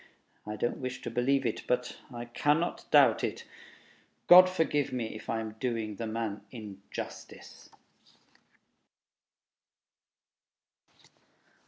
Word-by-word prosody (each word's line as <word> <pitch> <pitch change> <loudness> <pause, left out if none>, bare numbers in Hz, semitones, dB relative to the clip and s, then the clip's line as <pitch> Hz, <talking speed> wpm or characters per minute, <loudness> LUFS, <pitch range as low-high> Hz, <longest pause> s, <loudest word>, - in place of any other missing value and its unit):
I 105 - -4
don't 120 +3 -1
wish 130 0 -5
to - - -4
believe 130 +4 +1
it... - - -1
but 125 0 -1
I 120 -1 -6
cannot 145 +7 0
doubt - - +5
it. - - -3 0.8
God 185 +1 +9
forgive 160 -6 0
me 120 -3 -3
if 110 - -10
I 115 - 0
am 110 -1 -5
doing 115 -5 -2
the 115 - -4
man 110 -2 -3
injustice! 100 -5 -9
120 Hz, 110 wpm, -30 LUFS, 110-135 Hz, 0.8 s, God